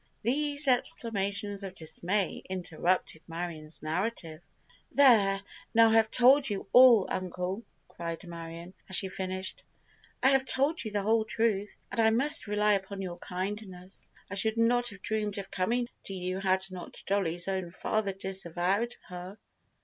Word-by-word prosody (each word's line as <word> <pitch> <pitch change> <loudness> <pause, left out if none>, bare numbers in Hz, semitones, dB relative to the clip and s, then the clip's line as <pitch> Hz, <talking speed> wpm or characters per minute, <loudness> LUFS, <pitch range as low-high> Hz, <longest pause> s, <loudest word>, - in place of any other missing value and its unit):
These 285 +4 +2
exclamations 205 -5 +1
of 190 -1 -7
dismay 180 +4 0
interrupted 180 -2 -1
Marion's 165 -2 -5
narrative. 165 -1 -3 0.5
"There—now 225 -2 +3
I - - +2
have 225 -1 +4
told 260 +4 +5
you 200 -2 -4
all, 245 -5 +7
uncle!" 185 +2 -4 0.3
cried 170 0 -7
Marion, 170 +1 -9 0.2
as 190 - +2
she 190 - +3
finished. 185 0 -2 0.6
"I 265 - +6
have 270 -1 +4
told 280 +5 +3
you 220 - -4
the 205 -1 -2
whole 220 +2 +2
truth, 215 -2 -1
and 230 - 0
I 220 - +5
must 275 +5 +5
rely 210 0 +2
upon 195 0 -3
your 175 -2 -7
kindness! 185 0 -6 0.2
I - - -8
should 220 +3 +2
not 240 +1 +2
have 200 -3 -13
dreamed 210 -2 -2
of 195 -1 -7
coming 235 +6 -1 0.2
to 195 - -5
you 185 +1 -4
had 190 -1 +1
not 180 -2 -9
Dollie's 175 -3 -1
own 190 -2 -3
father 200 +3 -2
disavowed 190 +3 -1
her." 180 +3 -8
195 Hz, 150 wpm, -29 LUFS, 185-225 Hz, 0.6 s, all